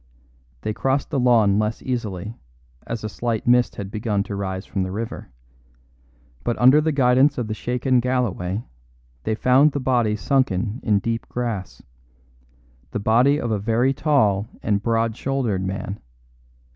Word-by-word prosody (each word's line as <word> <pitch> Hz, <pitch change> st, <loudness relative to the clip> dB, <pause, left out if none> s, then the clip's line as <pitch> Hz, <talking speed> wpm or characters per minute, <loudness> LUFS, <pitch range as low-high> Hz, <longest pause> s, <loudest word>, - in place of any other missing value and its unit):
They 110 Hz, -, -2 dB
crossed 135 Hz, +4 st, -1 dB
the 135 Hz, -, 0 dB
lawn 110 Hz, -5 st, +4 dB
less 110 Hz, +1 st, -2 dB
easily, 110 Hz, -5 st, -3 dB, 0.5 s
as 115 Hz, -2 st, -4 dB
a -, -, -2 dB
slight 110 Hz, +2 st, -3 dB
mist 125 Hz, 0 st, +3 dB
had 100 Hz, -1 st, -6 dB
begun 105 Hz, -2 st, -1 dB
to 100 Hz, -, -6 dB
rise 95 Hz, -1 st, -4 dB
from 95 Hz, -, -3 dB
the 95 Hz, -, -2 dB
river; 110 Hz, +3 st, -5 dB, 1.1 s
but 120 Hz, -, -1 dB
under 130 Hz, +5 st, +6 dB
the 160 Hz, +1 st, +1 dB
guidance 135 Hz, +1 st, +3 dB
of 125 Hz, -, -1 dB
the 110 Hz, -, -3 dB
shaken 125 Hz, +3 st, 0 dB
Galloway 115 Hz, -6 st, -1 dB, 0.6 s
they 110 Hz, -, 0 dB
found 135 Hz, +5 st, +4 dB
the 140 Hz, -, -1 dB
body 120 Hz, -5 st, +1 dB
sunken 110 Hz, -1 st, 0 dB
in 105 Hz, -3 st, +2 dB
deep 115 Hz, +3 st, -3 dB
grass 115 Hz, -6 st, -4 dB, 1.1 s
the -, -, -3 dB
body 120 Hz, +8 st, +3 dB
of 120 Hz, -, -2 dB
a 105 Hz, -, 0 dB
very 115 Hz, +6 st, +1 dB
tall 125 Hz, -9 st, +2 dB, 0.2 s
and 100 Hz, -2 st, +1 dB
broad 115 Hz, 0 st, 0 dB
shouldered 125 Hz, -8 st, -1 dB
man. 100 Hz, +2 st, -4 dB
115 Hz, 155 wpm, -22 LUFS, 105-125 Hz, 1.1 s, under